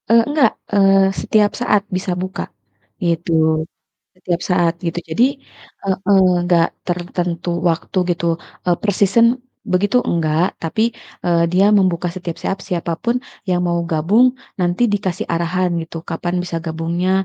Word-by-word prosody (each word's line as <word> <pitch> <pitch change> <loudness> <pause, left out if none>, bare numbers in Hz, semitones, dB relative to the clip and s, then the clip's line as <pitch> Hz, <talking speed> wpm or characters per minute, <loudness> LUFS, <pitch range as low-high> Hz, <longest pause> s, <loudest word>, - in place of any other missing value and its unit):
Eee, 230 0 +6
nggak, 295 -2 +4 0.2
eee, 195 -1 +5
setiap 210 +1 +2
saat 210 -4 +2
bisa 185 0 -2
buka, 185 +3 -4 0.6
gitu, 160 -2 +1 0.5
setiap 175 -1 -2
saat 175 -2 +3
gitu, 170 0 -2
jadi 230 +10 +3 0.6
heeh, 190 -1 0 0.4
enggak 175 -1 +3 0.2
tertentu 175 -1 -2 0.2
waktu 165 +4 -2
gitu, 170 0 -2 0.6
per 210 - +1
season 205 +4 +5 0.5
begitu 200 +6 +3
enggak, 165 +1 +1
tapi, 165 +7 0 0.4
eee, 170 -1 +3
dia 185 +2 +4
membuka 180 -2 +1
setiap 175 -3 -5
saat 195 - -1
siapapun 175 +5 -1 0.3
yang 180 -1 +2
mau 170 0 +1
gabung, 180 +10 +4 0.3
nanti 180 +5 +1
dikasih 190 -3 -2
arahan 175 +2 0
gitu, 165 0 -8
kapan 175 +1 -2
bisa 175 -2 -4
gabungnya 165 +3 -1
180 Hz, 130 wpm, -19 LUFS, 170-195 Hz, 0.6 s, Eee